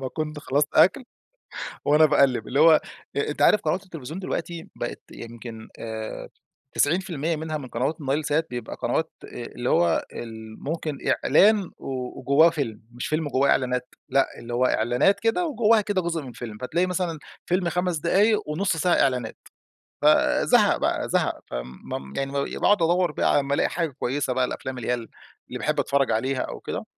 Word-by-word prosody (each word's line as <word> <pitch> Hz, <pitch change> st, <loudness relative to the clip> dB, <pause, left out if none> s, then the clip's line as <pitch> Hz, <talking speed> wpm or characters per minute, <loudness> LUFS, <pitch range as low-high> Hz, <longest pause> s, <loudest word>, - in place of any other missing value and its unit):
ما 130 Hz, -, -3 dB
كنت 150 Hz, +2 st, -4 dB
خلصت 145 Hz, 0 st, 0 dB
أكل 255 Hz, +9 st, +5 dB, 0.8 s
وأنا 150 Hz, +2 st, +5 dB
باقلب 135 Hz, -6 st, +2 dB
اللي 135 Hz, +3 st, +1 dB
هو 160 Hz, -1 st, +7 dB, 0.4 s
أ 140 Hz, -, 0 dB
أنتَ 150 Hz, -, -2 dB
عارف 210 Hz, -, +6 dB
قنوات 175 Hz, +5 st, -1 dB
التلفزيون 165 Hz, -3 st, -8 dB
دلوقتي 170 Hz, -2 st, -4 dB
بقت -, -, -5 dB
يمكن 115 Hz, -1 st, -9 dB
آآ 110 Hz, -1 st, -6 dB, 0.5 s
90% 165 Hz, 0 st, 0 dB
منها 155 Hz, 0 st, -3 dB
من 135 Hz, -3 st, -8 dB
قنوات 130 Hz, +8 st, -2 dB
النايل 145 Hz, +2 st, -1 dB
سات 155 Hz, +3 st, +1 dB
بيبقى 120 Hz, -1 st, -5 dB
قنوات -, -, 0 dB
آآ -, -, -9 dB, 0.2 s
اللي -, -, -4 dB
هو 85 Hz, -1 st, +2 dB
ال 110 Hz, -1 st, -9 dB
ممكن 155 Hz, -1 st, -3 dB, 0.3 s
إعلان 200 Hz, +5 st, +4 dB
و 130 Hz, -2 st, -5 dB
وجواه 140 Hz, +6 st, +5 dB
فيلم، 135 Hz, -10 st, -3 dB
مش 120 Hz, +1 st, -5 dB
فيلم 155 Hz, 0 st, -1 dB
وجواه 140 Hz, 0 st, +2 dB
إعلانات 125 Hz, -1 st, 0 dB, 0.2 s
لأ، 135 Hz, +1 st, +3 dB
اللي 120 Hz, 0 st, -6 dB
هو 125 Hz, +1 st, +3 dB
إعلانات 120 Hz, -, +2 dB
كده 230 Hz, +11 st, +1 dB
وجواها 230 Hz, -6 st, +3 dB
كده 205 Hz, -2 st, 0 dB
جزء 170 Hz, -2 st, -2 dB
من 130 Hz, -3 st, -9 dB
فيلم. 110 Hz, -2 st, -8 dB
فتلاقي 170 Hz, +9 st, 0 dB
مثلًا 180 Hz, -3 st, -2 dB, 0.3 s
فيلم 180 Hz, 0 st, +1 dB
5 180 Hz, 0 st, 0 dB
دقايق، 200 Hz, +7 st, +2 dB
ونص 165 Hz, +3 st, 0 dB
ساعة 175 Hz, +2 st, +2 dB
إعلانات. 125 Hz, -4 st, 0 dB, 0.7 s
فزهق -, -, +4 dB
بقى -, -, -1 dB
زهق، -, -, 0 dB
ف -, -, -13 dB
م 65 Hz, +2 st, -6 dB
يعني 135 Hz, 0 st, -2 dB
ب -, -, -7 dB, 0.3 s
باقعد 205 Hz, -4 st, +4 dB
أدوَّر 175 Hz, +1 st, +2 dB
بقى -, -, +1 dB
على -, -, +4 dB
أمّا 140 Hz, 0 st, -1 dB
الاقي -, -, +1 dB
حاجة 165 Hz, -2 st, -1 dB
كويسة 135 Hz, +1 st, -1 dB
بقى 130 Hz, 0 st, +2 dB
الأفلام 130 Hz, +1 st, -5 dB
اللي 125 Hz, -, -5 dB
هي -, -, +3 dB
ال 115 Hz, -2 st, -5 dB, 0.4 s
اللي -, -, -6 dB
باحب -, -, 0 dB
أتفرّج 140 Hz, -1 st, +1 dB
عليها 130 Hz, +4 st, 0 dB
أو -, -, -5 dB
كده، -, -, -5 dB
145 Hz, 180 wpm, -25 LUFS, 125-170 Hz, 0.8 s, هو